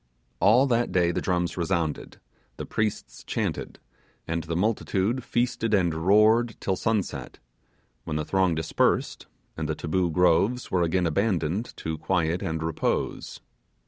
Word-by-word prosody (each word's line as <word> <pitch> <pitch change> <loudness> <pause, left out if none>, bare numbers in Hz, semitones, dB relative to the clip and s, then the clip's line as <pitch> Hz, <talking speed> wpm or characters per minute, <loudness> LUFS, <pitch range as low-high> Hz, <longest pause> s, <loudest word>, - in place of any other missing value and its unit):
All 115 +7 +5
that 120 -2 +1
day 85 -2 +2
the - - -2
drums 90 -2 -1
resounded, 85 -3 -2 0.4
the - - -5
priests 110 -1 -3
chanted, - - -3 0.5
and 85 0 -2
the 85 0 -3
multitude 105 +4 0
feasted 120 -3 0
and 90 -4 +2
roared 105 +7 +3
till 95 - -1
sunset, 110 -1 -2 0.7
when 75 - -4
the 75 0 -1
throng 95 -3 +1
dispersed, 80 0 0 0.3
and 80 -1 -4
the 80 - -1
Taboo 85 +3 0
Groves 90 +8 +2
were 90 - +2
again 90 +2 +1
abandoned 95 +2 -1
to 80 -1 -4
quiet 85 -2 0
and 80 0 -3
repose. 80 -1 -2
90 Hz, 140 wpm, -26 LUFS, 80-105 Hz, 0.7 s, All